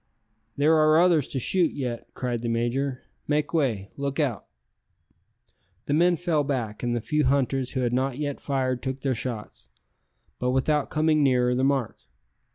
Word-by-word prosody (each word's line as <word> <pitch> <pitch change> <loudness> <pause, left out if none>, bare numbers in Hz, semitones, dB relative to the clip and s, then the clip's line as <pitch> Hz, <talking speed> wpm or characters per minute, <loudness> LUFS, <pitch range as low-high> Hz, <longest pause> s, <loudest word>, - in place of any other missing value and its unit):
"There 150 +3 +4
are 155 +1 +5
others 170 -5 +4
to - - -5
shoot 170 +6 +2
yet," 125 -4 -4
cried 120 -2 -2
the 120 - -2
major. 125 +3 -1 0.2
"Make 150 0 0
way. 115 -11 0
Look 140 +1 -3
out." 130 - -1 1.4
The 145 - -1
men 175 +3 +4
fell 165 -3 0
back, 120 -7 -3
and 120 -1 -1
the 120 - -2
few 150 +6 0
hunters 135 -1 0
who 130 - -1
had 120 -1 0
not 130 0 0
yet 145 -2 -3
fired 130 -3 -1
took 130 0 -4
their 135 -1 0
shots, 115 -2 -5 0.7
but 125 - 0
without 140 +3 +1
coming 155 0 +2
nearer 125 -3 +3
the 130 +1 0
mark. 135 -4 0
135 Hz, 165 wpm, -25 LUFS, 125-150 Hz, 1.4 s, are